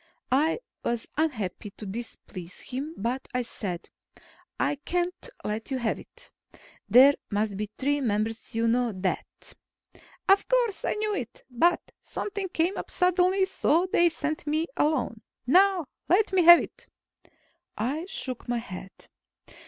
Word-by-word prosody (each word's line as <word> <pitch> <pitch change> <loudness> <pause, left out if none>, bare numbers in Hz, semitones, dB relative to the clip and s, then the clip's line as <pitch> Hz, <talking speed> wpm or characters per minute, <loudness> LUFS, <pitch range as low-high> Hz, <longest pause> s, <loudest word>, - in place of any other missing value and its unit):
I 305 - +3 0.2
was 235 -1 -1
unhappy 225 - -2
to 215 - -8
displease 190 -4 -7
him, 280 +6 -5
but 245 +5 -2
I 250 - +1
said, 185 -7 -5 0.7
"I 290 - +1
can't 350 +4 -2
let 215 +1 -3
you 265 - -1
have 235 -3 -1
it. - - -12 0.6
There 260 +6 +8 0.2
must 205 -1 -1
be 210 +1 -3
three 285 +2 +1
members. 220 -1 -2
You 230 0 +2
know 240 -1 +2
that." 185 0 -4 0.7
"Of 390 +1 +5
course, - - +1
I - - +1
know 425 0 -1
it. 245 - -5
But 340 +9 +2
something 400 -2 -4
came 345 +2 0
up - - -5
suddenly, 365 +1 +3
so 350 -2 +2
they 345 -4 +5
sent 310 0 -3
me 310 +2 +1
alone. 260 -7 0 0.2
Now, 370 +4 +4 0.2
let 390 +3 +3
me 365 -3 +4
have 345 0 +11
it." - - -10 0.9
I 280 - -2
shook 255 -9 -3
my 240 - +1
head. 190 -4 -8
275 Hz, 145 wpm, -27 LUFS, 225-350 Hz, 0.9 s, have